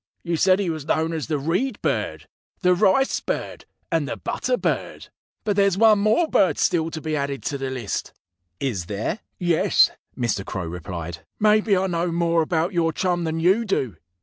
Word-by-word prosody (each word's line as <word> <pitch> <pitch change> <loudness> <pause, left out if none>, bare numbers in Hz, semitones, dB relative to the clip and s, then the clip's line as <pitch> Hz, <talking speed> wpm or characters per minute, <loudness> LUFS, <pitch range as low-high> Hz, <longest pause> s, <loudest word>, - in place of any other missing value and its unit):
You 170 0 -1
said 185 +3 +4
he 190 -4 0
was 155 -2 -6
known 160 +1 +1
as 160 -3 -3
the 155 -2 0
Reed 180 - -1
Bird, - - -2 0.4
the 180 0 +5
Rice 195 +9 +3
Bird, - - -4 0.3
and - - 0
the - - -4
Butter - - -1
Bird. - - -3 0.3
But 205 -2 0
there's 200 -2 +3
one 220 -1 +6
more 215 +11 +3
bird 190 - +3
still 165 -2 +1
to 160 - -5
be 155 0 -2
added 140 -1 -3
to 140 - -2
the 135 -1 -3
list." 125 -6 -4 0.5
"Is 105 -11 -2
there?" 105 - -3 0.2
"Yes!" 175 -3 +3 0.3
Mr. 115 -5 -1
Crow 95 -2 -4
replied. 85 0 -6 0.2
"Maybe 210 -1 +4
I 190 - +1
know 175 -1 -1
more 170 0 +2
about 165 +3 0
your 165 -2 +2
chum 175 0 -1
than 160 0 -2
you 190 +7 +3
do. 135 - -1
165 Hz, 185 wpm, -23 LUFS, 140-190 Hz, 0.5 s, one